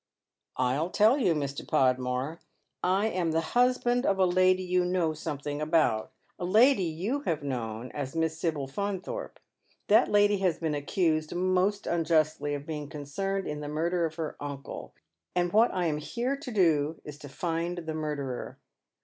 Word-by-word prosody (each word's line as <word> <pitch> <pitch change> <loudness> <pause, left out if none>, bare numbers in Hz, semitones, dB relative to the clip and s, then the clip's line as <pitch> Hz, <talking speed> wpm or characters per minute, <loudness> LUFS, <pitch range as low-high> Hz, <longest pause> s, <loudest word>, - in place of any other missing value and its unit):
" - - -34
I'll 130 +6 +1
tell 220 +8 +4
you, 185 -10 +3
Mr. 140 -2 -3
Podmore. 130 +4 0 0.4
I 190 +3 +2
am 175 -5 -1
the 165 - +2
husband 245 0 +3
of 195 -7 +2
a 190 - +4
lady 185 +1 +3
you 180 0 +1
know 180 -3 +1
something 145 -2 -4
about; 155 -9 +2 0.3
a - - -4
lady 220 +7 +5
you 180 - -2
have 155 -3 0
known 120 -3 -4
as 145 0 -5
Miss 160 0 0
Sibyl 155 -5 -1
Faunthorpe. 200 - -4 0.5
Tliat - - +5
lady 205 -1 +3
has 180 -4 +1
been 160 -2 -2
accused 155 +2 0
most 185 +3 +1
unjustly 155 -3 +1
of 145 0 -7
being 150 -2 -5
concerned 175 +7 -3
in 150 0 -4
the 150 - -5
murder 170 +3 0
of 160 - -11
her 160 -2 -4
uncle, 140 -1 -7 0.4
and 175 -1 +1
what 225 +3 +5
I 180 -1 -1
am 150 -2 0
here 245 - -2
to 275 -2 -8
do 160 -6 +2
is 150 -1 -9
to 145 - -10
find 170 +3 -2
the 160 -2 -4
murderer." 150 -5 -4
165 Hz, 170 wpm, -28 LUFS, 145-185 Hz, 0.5 s, lady